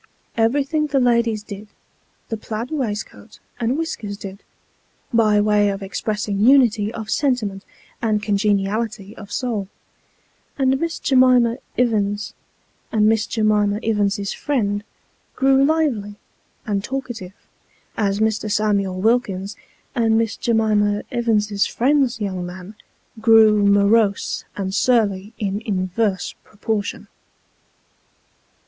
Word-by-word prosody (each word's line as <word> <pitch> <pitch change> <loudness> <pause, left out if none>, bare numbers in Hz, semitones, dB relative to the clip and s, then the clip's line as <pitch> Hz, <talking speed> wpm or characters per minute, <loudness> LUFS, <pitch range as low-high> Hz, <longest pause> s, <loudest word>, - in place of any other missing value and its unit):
Everything 280 +7 +1
the 280 -2 +1
ladies 235 -3 +2
did, 205 0 -9 0.6
the 225 - -2
plaid 220 +3 -5
waistcoat 210 - -5 0.2
and 240 +3 0
whiskers 220 -11 -4
did, 195 0 -9 0.7
by 215 -2 +4
way 205 0 +3
of 195 0 -4
expressing 205 +1 -3
unity 225 -3 +4
of 220 -2 -6
sentiment 220 -9 0 0.4
and 215 -2 0
congeniality 205 0 -1
of 205 -1 -11
soul; 220 -5 -2 0.9
and 265 -1 +2
Miss 335 +1 -2
J'mima 255 -2 +4 0.2
Ivins, 210 -3 0 0.6
and 215 -1 +2
Miss 220 0 +2
J'mima 210 -2 +1
Ivins's 205 -2 0
friend, 205 -8 -1 0.5
grew 270 0 +4
lively 275 -10 0 0.5
and 200 -3 -1
talkative, 240 -8 -5 0.6
as 200 -2 0
Mr. 220 -1 0
Samuel 200 -3 0
Wilkins, 205 -3 0 0.4
and 225 -2 +2
Miss 225 -1 0
J'mima 210 -3 +1
Ivins's 215 -4 +1
friend's 260 -2 +1
young 190 -4 -3
man, 180 +3 -8 0.5
grew 220 -2 +5
morose 200 +1 +2
and 190 -1 -3
surly 210 -4 +1
in 200 0 -2
inverse 190 -1 -1
proportion. 210 0 -4
215 Hz, 110 wpm, -21 LUFS, 200-235 Hz, 0.9 s, grew